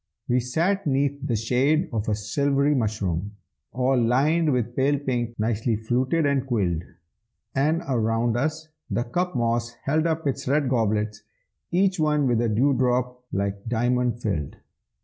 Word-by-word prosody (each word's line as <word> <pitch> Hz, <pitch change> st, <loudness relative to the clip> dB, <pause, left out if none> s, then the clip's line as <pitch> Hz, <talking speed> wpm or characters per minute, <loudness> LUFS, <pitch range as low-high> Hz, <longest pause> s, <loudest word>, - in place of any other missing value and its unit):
We 125 Hz, +1 st, +2 dB
sat 165 Hz, +10 st, 0 dB
'neath 140 Hz, 0 st, +1 dB
the 130 Hz, -5 st, -1 dB
shade 135 Hz, -, +2 dB
of 110 Hz, 0 st, -1 dB
a 105 Hz, -, +2 dB
silvery 140 Hz, +7 st, +1 dB
mushroom, 105 Hz, -, -1 dB, 0.4 s
All 130 Hz, +2 st, +1 dB
lined 150 Hz, +7 st, +2 dB
with 120 Hz, -2 st, -1 dB
pale 140 Hz, +2 st, +2 dB
pink, 120 Hz, -4 st, -2 dB
nicely 110 Hz, +1 st, 0 dB
fluted 125 Hz, +8 st, 0 dB
and 140 Hz, -2 st, +2 dB
quilled, 95 Hz, -10 st, 0 dB, 0.7 s
And 155 Hz, +5 st, +1 dB
around 115 Hz, -2 st, +1 dB
us 155 Hz, +5 st, -2 dB, 0.2 s
the 120 Hz, -, 0 dB
cup 175 Hz, +9 st, -2 dB
moss 115 Hz, 0 st, 0 dB
held 155 Hz, +4 st, +1 dB
up 160 Hz, -1 st, -1 dB
its 140 Hz, -2 st, -2 dB
red 140 Hz, 0 st, +2 dB
goblets, 110 Hz, -3 st, 0 dB, 0.5 s
Each 185 Hz, 0 st, +2 dB
one 150 Hz, -2 st, +2 dB
with 120 Hz, -3 st, +2 dB
a 120 Hz, -, +1 dB
dew 130 Hz, +7 st, +3 dB
drop 125 Hz, 0 st, 0 dB
like 100 Hz, +1 st, -2 dB
diamond 120 Hz, +1 st, +1 dB
filled. 85 Hz, -, -2 dB
125 Hz, 150 wpm, -25 LUFS, 115-145 Hz, 0.7 s, dew